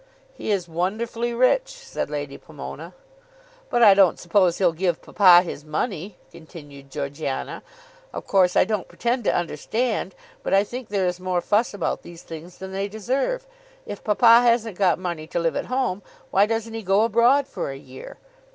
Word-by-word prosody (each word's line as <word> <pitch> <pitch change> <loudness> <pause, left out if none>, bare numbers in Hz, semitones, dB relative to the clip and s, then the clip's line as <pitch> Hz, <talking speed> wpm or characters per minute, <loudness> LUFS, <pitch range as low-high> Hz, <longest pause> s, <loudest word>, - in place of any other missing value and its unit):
"He - - -7
is 195 -4 0
wonderfully 225 +8 -2
rich," 255 - +2
said - - -6
Lady - - -5
Pomona. - - -9 0.7
"But 240 - +3
I 205 -3 +9
don't 195 -2 +4
suppose 175 0 +2
he'll 180 -3 +3
give 170 0 -1
papa 180 -4 +6
his 150 -5 -7
money," 180 +4 -4
continued 145 -4 -13
Georgiana. 140 0 -4 0.5
"Of - - -7
course 185 -2 +3
I - - +6
don't 210 -4 -2
pretend 240 -1 -2
to - - +2
understand, 195 - -2 0.3
but - - +1
I 195 - +5
think 245 +3 -8
there 200 -2 0
is 180 0 -2
more 185 -1 -1
fuss 210 +6 +1
about 195 - -2
these 170 0 -12
things 165 +2 -10
than 190 0 -8
they 195 +1 -2
deserve. 260 - -2 0.4
If - - -8
papa 230 +2 +6
hasn't 230 -4 +2
got 185 -3 +3
money 170 -4 -5
to - - -4
live 165 -1 0
at - - -2
home, 250 -7 -1 0.3
why 200 +2 +4
doesn't 225 0 -3
he 225 - -4
go 195 +1 +2
abroad 235 +5 +4
for - - -5
a 135 - -6
year? 130 -1 -12
195 Hz, 180 wpm, -23 LUFS, 175-230 Hz, 0.7 s, I